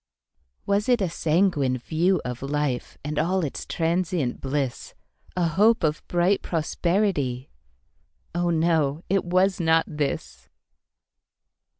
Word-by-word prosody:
Was 200 Hz, +4 st, +1 dB
it 245 Hz, -1 st, +4 dB
a 195 Hz, -, +1 dB
sanguine 155 Hz, -6 st, +1 dB
view 170 Hz, +8 st, +1 dB
of 125 Hz, -1 st, -5 dB
life, 140 Hz, -2 st, -2 dB
And 150 Hz, 0 st, -2 dB
all 180 Hz, +4 st, +1 dB
its 140 Hz, -, -6 dB
transient 165 Hz, -5 st, -1 dB
bliss,A 145 Hz, +5 st, -4 dB
hope 215 Hz, +7 st, +3 dB
of 155 Hz, -1 st, +1 dB
bright 175 Hz, +3 st, +2 dB
prosperity? 160 Hz, -6 st, -1 dB, 0.8 s
Oh, 175 Hz, 0 st, 0 dB
no! 160 Hz, -2 st, +1 dB
it 195 Hz, 0 st, +2 dB
was 185 Hz, +2 st, +2 dB
not 165 Hz, -1 st, +3 dB
this. 150 Hz, -2 st, -4 dB
165 Hz, 110 wpm, -25 LUFS, 145-185 Hz, 0.8 s, it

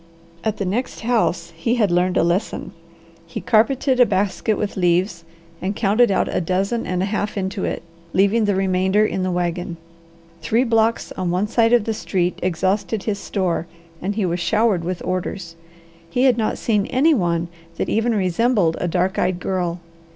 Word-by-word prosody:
At 215 Hz, -1 st, -1 dB
the 200 Hz, -, -2 dB
next 220 Hz, +8 st, -2 dB
house 185 Hz, -8 st, 0 dB
he 230 Hz, +9 st, 0 dB
had 210 Hz, -6 st, +2 dB
learned 180 Hz, +1 st, +2 dB
a -, -, +4 dB
lesson. 175 Hz, +6 st, -1 dB, 0.6 s
He 165 Hz, -, -5 dB
carpeted 255 Hz, +4 st, +2 dB
a 245 Hz, -, +8 dB
basket 200 Hz, +2 st, 0 dB
with 210 Hz, -, -3 dB
leaves 175 Hz, -1 st, +1 dB, 0.4 s
and 195 Hz, +2 st, -2 dB
counted 225 Hz, +3 st, +3 dB
out 195 Hz, -, +1 dB
a -, -, -1 dB
dozen 195 Hz, +7 st, -1 dB
and 180 Hz, 0 st, -1 dB
a -, -, +1 dB
half 205 Hz, +1 st, -2 dB
into 190 Hz, +1 st, -2 dB
it, -, -, -3 dB, 0.3 s
leaving 200 Hz, +4 st, +3 dB
the 205 Hz, -1 st, +1 dB
remainder 190 Hz, +2 st, +2 dB
in 190 Hz, -, -2 dB
the 185 Hz, -, 0 dB
wagon. 175 Hz, 0 st, -2 dB, 0.6 s
Three 220 Hz, +10 st, +2 dB
blocks 225 Hz, -1 st, +1 dB
on 185 Hz, -2 st, -3 dB
one 180 Hz, +4 st, 0 dB
side 230 Hz, +1 st, +2 dB
of 240 Hz, -3 st, +5 dB
the 225 Hz, -, -1 dB
street 180 Hz, -4 st, -1 dB
exhausted 190 Hz, +4 st, 0 dB
his 205 Hz, -2 st, -2 dB
store 180 Hz, -5 st, -2 dB, 0.3 s
and 200 Hz, +2 st, -2 dB
he 210 Hz, -3 st, 0 dB
was 175 Hz, 0 st, -1 dB
showered 210 Hz, -1 st, +2 dB
with 180 Hz, +1 st, -4 dB
orders. 185 Hz, -1 st, -3 dB, 0.5 s
He 250 Hz, +8 st, +1 dB
had 260 Hz, -3 st, +5 dB
not 220 Hz, -2 st, -1 dB
seen 210 Hz, -3 st, 0 dB
any 295 Hz, +6 st, +3 dB
one 170 Hz, -, 0 dB, 0.3 s
that -, -, -1 dB
even 225 Hz, +1 st, +1 dB
resembled 190 Hz, -2 st, +2 dB
a 180 Hz, -, 0 dB
dark 180 Hz, +2 st, 0 dB
eyed 185 Hz, -1 st, 0 dB
girl. 180 Hz, -2 st, -2 dB
195 Hz, 180 wpm, -21 LUFS, 180-220 Hz, 0.6 s, a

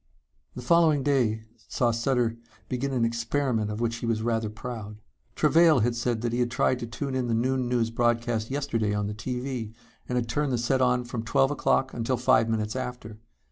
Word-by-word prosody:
The -, -, -7 dB
following 155 Hz, -1 st, +4 dB
day 120 Hz, -6 st, +1 dB, 0.3 s
saw 120 Hz, -2 st, +1 dB
Sutter 115 Hz, 0 st, 0 dB, 0.3 s
begin 130 Hz, +2 st, -2 dB
an 125 Hz, -3 st, +1 dB
experiment 115 Hz, -1 st, -1 dB
of 105 Hz, +1 st, -4 dB
which 115 Hz, 0 st, -1 dB
he 120 Hz, -, -4 dB
was 110 Hz, -1 st, 0 dB
rather 115 Hz, -2 st, 0 dB
proud. 110 Hz, -1 st, -7 dB, 0.4 s
Travail 160 Hz, -5 st, +5 dB
had 120 Hz, +2 st, +1 dB
said 120 Hz, -1 st, -1 dB
that 120 Hz, -1 st, -2 dB
he 120 Hz, -, 0 dB
had 120 Hz, -1 st, +1 dB
tried 125 Hz, +1 st, +1 dB
to 120 Hz, -, -5 dB
tune 135 Hz, +3 st, -4 dB
in 130 Hz, -2 st, -1 dB
the 115 Hz, -, +1 dB
noon 130 Hz, +1 st, 0 dB
news 115 Hz, -2 st, +1 dB
broadcast 120 Hz, -1 st, 0 dB
yesterday 125 Hz, -7 st, -1 dB
on 105 Hz, 0 st, -1 dB
the 105 Hz, -, -3 dB
TV 125 Hz, 0 st, -4 dB, 0.4 s
and 125 Hz, -, -1 dB
had 120 Hz, -1 st, 0 dB
turned 140 Hz, +3 st, -1 dB
the -, -, +1 dB
set 130 Hz, +3 st, +1 dB
on 125 Hz, -1 st, +2 dB
from 120 Hz, -1 st, -5 dB
twelve 135 Hz, +4 st, +2 dB
o'clock 135 Hz, -2 st, +1 dB
until 120 Hz, +2 st, -1 dB
five 120 Hz, -2 st, +3 dB
minutes 110 Hz, 0 st, -1 dB
after. 125 Hz, -4 st, -6 dB
120 Hz, 200 wpm, -27 LUFS, 115-130 Hz, 0.4 s, Travail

